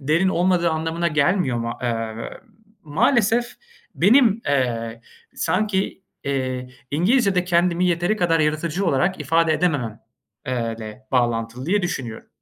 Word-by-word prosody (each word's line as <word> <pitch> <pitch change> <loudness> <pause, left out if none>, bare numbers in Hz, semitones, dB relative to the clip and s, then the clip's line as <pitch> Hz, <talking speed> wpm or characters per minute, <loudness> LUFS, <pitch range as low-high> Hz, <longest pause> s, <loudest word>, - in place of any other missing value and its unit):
derin 160 +7 +2
olmadığı 175 -2 +2
anlamına 165 +2 -1
gelmiyor. 155 -4 +1
Ma 115 0 -4
emm, 115 -2 -2
ııı, - - -6 0.5
maalesef 230 - +2 0.5
benim, 225 - +4
eee, 115 -4 -1 0.3
sanki, 195 -1 -1 0.2
eee, 130 -2 -2 0.2
İngilizcede 190 - +2
kendimi 175 0 +2
yeteri 175 +4 +1
kadar 165 -3 +2
yaratıcı 155 +5 0
olarak 170 +4 +1
ifade 165 +2 +2
edemem, 145 -9 -1 0.5
eee, 115 -3 -2
le 110 +3 -9
bağlantılı 120 +1 0
diye 200 +2 +2
düşünüyorum. 125 -10 -4
160 Hz, 120 wpm, -22 LUFS, 125-180 Hz, 0.5 s, benim